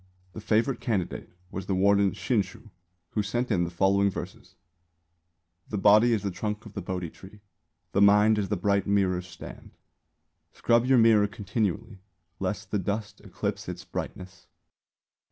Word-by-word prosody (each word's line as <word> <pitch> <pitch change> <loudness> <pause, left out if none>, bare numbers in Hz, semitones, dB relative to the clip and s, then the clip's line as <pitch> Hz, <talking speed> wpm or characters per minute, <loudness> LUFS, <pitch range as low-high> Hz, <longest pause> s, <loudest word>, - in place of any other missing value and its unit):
The 110 - -8
favourite 110 +5 +1
candidate 100 -8 -2 0.2
was 95 0 -6
the 95 - 0
warden 100 0 +3
Shinshū, 105 0 -2 0.4
who 105 - -1
sent 120 +4 -2
in 90 -4 +2
the - - -4
following 100 +3 +2
verses: - - -8 1.1
_The 105 - -2
body 105 +4 +6
is 110 -3 0
the 100 - -2
trunk 105 +3 -4
of 105 - -11
the 100 - -4
Bodhi 90 -2 -4
tree; 100 +2 -15 0.5
The 100 - +1
mind 105 +2 +5
is 100 - -2
the 105 - 0
bright 100 +2 +1
mirror's 95 -3 +1
stand; 85 -2 -11 0.8
Scrub 120 +1 +2
your 135 -1 +5
mirror 110 -3 +5
continually, 105 0 -3 0.4
Lest 95 +1 -4
the 105 - +1
dust 105 +3 -4
eclipse - - -4
its - - -7
brightness. 90 -1 -7
100 Hz, 155 wpm, -27 LUFS, 95-110 Hz, 1.1 s, body